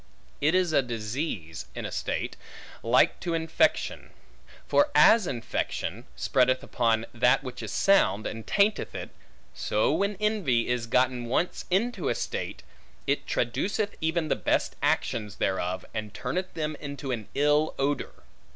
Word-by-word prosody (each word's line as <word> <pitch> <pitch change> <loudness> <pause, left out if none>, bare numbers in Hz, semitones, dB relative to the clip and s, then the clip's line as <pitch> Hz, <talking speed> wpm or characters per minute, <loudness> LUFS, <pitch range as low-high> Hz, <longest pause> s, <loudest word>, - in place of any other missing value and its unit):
It 155 +5 +3
is 180 -3 +2
a 140 - +5
disease, 110 - -4
in - - -4
a - - -4
state, - - -2 0.5
like 120 +3 +3
to 170 -2 -2
infection. 160 0 +1 0.6
For 290 +1 +4
as 220 -5 +7
infection 120 -3 -3
spreadeth 130 - +2
upon 115 -2 +1
that 125 +4 +3
which 125 -2 -7
is - - -5
sound, 110 - +3
and 115 0 -5
tainteth 205 +1 +1
it; - - -6 0.4
so - - +1
when 200 0 0
envy 190 - +1
is 125 -2 -1
gotten 125 0 +2
once 135 +9 -1
into 225 +7 0
a - - +1
state, - - -4 0.4
it - - 0
traduceth 210 - -1
even 160 0 0
the - - +1
best - - 0
actions 105 -3 0
thereof, 95 -1 -1
and 110 -2 -5
turneth 155 +10 -3
them 155 -1 -2
into 140 -2 -5
an 110 -4 -3
ill 150 +2 +3
odor. 140 +1 -2
135 Hz, 145 wpm, -27 LUFS, 115-180 Hz, 0.6 s, as